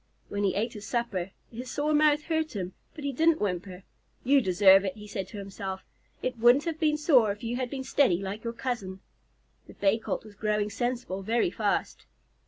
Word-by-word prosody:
When 205 Hz, 0 st, -2 dB
he 195 Hz, -, +1 dB
ate 225 Hz, +4 st, -1 dB
his 210 Hz, -2 st, -8 dB
supper, 220 Hz, -7 st, -2 dB, 0.2 s
his 245 Hz, +2 st, -7 dB
sore 295 Hz, +1 st, 0 dB
mouth 300 Hz, 0 st, +4 dB
hurt 315 Hz, -4 st, -1 dB
him, 185 Hz, -2 st, -4 dB, 0.2 s
but 300 Hz, -, -8 dB
he 280 Hz, -, -1 dB
didn't 325 Hz, +4 st, +3 dB
whimper. 185 Hz, -1 st, -3 dB, 0.4 s
"You 275 Hz, +2 st, +5 dB
deserve 190 Hz, -1 st, +6 dB
it," 190 Hz, -2 st, -3 dB
he 210 Hz, -, -10 dB
said 195 Hz, -2 st, -5 dB
to 210 Hz, -, -10 dB
himself. 195 Hz, -1 st, -6 dB, 0.4 s
"It 255 Hz, -2 st, -2 dB
wouldn't 240 Hz, +5 st, +6 dB
have 325 Hz, -2 st, -3 dB
been 305 Hz, -2 st, +2 dB
sore 270 Hz, -9 st, +4 dB
if 205 Hz, +4 st, -8 dB
you 235 Hz, +1 st, -2 dB
had 255 Hz, -1 st, -2 dB
been 265 Hz, 0 st, -4 dB
steady 260 Hz, -8 st, +3 dB
like 195 Hz, +3 st, -5 dB
your 230 Hz, 0 st, -3 dB
cousin." 215 Hz, -7 st, -4 dB, 0.7 s
The -, -, -13 dB
Bay 200 Hz, +3 st, +2 dB
Colt 220 Hz, -, -4 dB
was 215 Hz, -, -12 dB
growing 210 Hz, 0 st, -1 dB
sensible 240 Hz, -4 st, -2 dB
very 225 Hz, -2 st, +1 dB
fast. 205 Hz, -1 st, -2 dB
225 Hz, 200 wpm, -28 LUFS, 195-260 Hz, 0.7 s, deserve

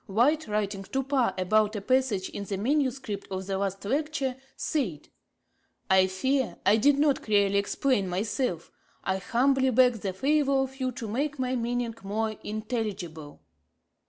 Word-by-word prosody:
White, 260 Hz, +10 st, +2 dB
writing 205 Hz, -2 st, -1 dB
to 235 Hz, +8 st, -2 dB
Parr 265 Hz, -2 st, +1 dB
about 215 Hz, +3 st, +2 dB
a 205 Hz, -, -3 dB
passage 255 Hz, -5 st, +1 dB
in 200 Hz, -, -6 dB
the 195 Hz, -1 st, -3 dB
manuscript 260 Hz, -3 st, -1 dB
of 190 Hz, 0 st, -4 dB
the 195 Hz, 0 st, -2 dB
last 195 Hz, 0 st, -3 dB
Lecture, 280 Hz, +1 st, -1 dB, 0.2 s
said: 210 Hz, -, -2 dB, 0.8 s
'I 190 Hz, 0 st, +6 dB
fear 260 Hz, +7 st, 0 dB
I 210 Hz, +2 st, +5 dB
did 280 Hz, +5 st, +4 dB
not 290 Hz, -1 st, +2 dB
clearly 200 Hz, -2 st, +3 dB
explain 205 Hz, 0 st, 0 dB
myself; 195 Hz, -, -2 dB, 0.3 s
I 190 Hz, 0 st, 0 dB
humbly 265 Hz, +6 st, +2 dB
beg 250 Hz, -1 st, +4 dB
the 195 Hz, -2 st, -3 dB
favour 275 Hz, +7 st, +2 dB
of 265 Hz, 0 st, -7 dB
you 255 Hz, -1 st, 0 dB
to 240 Hz, -2 st, -6 dB
make 285 Hz, +7 st, -2 dB
my 255 Hz, 0 st, -1 dB
meaning 240 Hz, -1 st, -1 dB
more 215 Hz, +3 st, -1 dB
intelligible.' 210 Hz, -9 st, -4 dB
225 Hz, 155 wpm, -27 LUFS, 200-265 Hz, 0.8 s, I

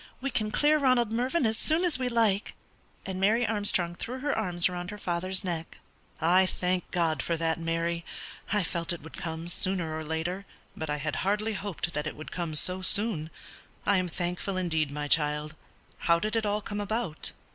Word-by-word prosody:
We 275 Hz, +1 st, -2 dB
can 215 Hz, -3 st, 0 dB
clear 300 Hz, +7 st, +4 dB
Ronald 255 Hz, -5 st, +3 dB
Mervyn 250 Hz, +6 st, +1 dB
as 220 Hz, +1 st, +1 dB
soon 325 Hz, +3 st, +2 dB
as 320 Hz, -7 st, +1 dB
we 255 Hz, -1 st, 0 dB
like." 225 Hz, -4 st, +2 dB, 0.5 s
And 190 Hz, -1 st, -3 dB
Mary 225 Hz, +5 st, +4 dB
Armstrong 205 Hz, -5 st, +1 dB
threw 245 Hz, +8 st, -5 dB
her 290 Hz, 0 st, +1 dB
arms 175 Hz, -5 st, +2 dB
round 180 Hz, 0 st, -4 dB
her 210 Hz, -, -6 dB
father's 185 Hz, 0 st, -1 dB
neck. 170 Hz, -3 st, -4 dB, 0.4 s
"I 180 Hz, +3 st, +5 dB
thank 180 Hz, 0 st, -1 dB
God 165 Hz, -5 st, +1 dB
for 170 Hz, -, 0 dB
that, 165 Hz, +1 st, 0 dB
Mary. 165 Hz, +1 st, -1 dB, 0.5 s
I 210 Hz, -1 st, +3 dB
felt 170 Hz, +1 st, +2 dB
it 170 Hz, -, -7 dB
would 160 Hz, -, -10 dB
come 165 Hz, 0 st, -4 dB
sooner 175 Hz, -3 st, -1 dB
or 160 Hz, -, -3 dB
later, 165 Hz, +5 st, -3 dB, 0.3 s
but 160 Hz, -1 st, -4 dB
I 150 Hz, -, 0 dB
had 150 Hz, +1 st, -2 dB
hardly 210 Hz, +3 st, +1 dB
hoped 190 Hz, -4 st, -3 dB
that 150 Hz, +1 st, -2 dB
it -, -, -4 dB
would 155 Hz, -, -8 dB
come 170 Hz, -3 st, -3 dB
so 180 Hz, +4 st, +2 dB
soon. 185 Hz, -4 st, -1 dB, 0.6 s
I 200 Hz, -, +4 dB
am 185 Hz, -1 st, +1 dB
thankful, 180 Hz, +3 st, -2 dB
indeed, 160 Hz, -5 st, +1 dB
my 145 Hz, +1 st, -3 dB
child; 150 Hz, 0 st, +3 dB, 0.5 s
how 170 Hz, -1 st, +4 dB
did 215 Hz, +6 st, -2 dB
it 220 Hz, -2 st, +1 dB
all 205 Hz, 0 st, 0 dB
come 205 Hz, 0 st, -3 dB
about?" 205 Hz, -5 st, -2 dB
180 Hz, 195 wpm, -29 LUFS, 165-215 Hz, 0.6 s, I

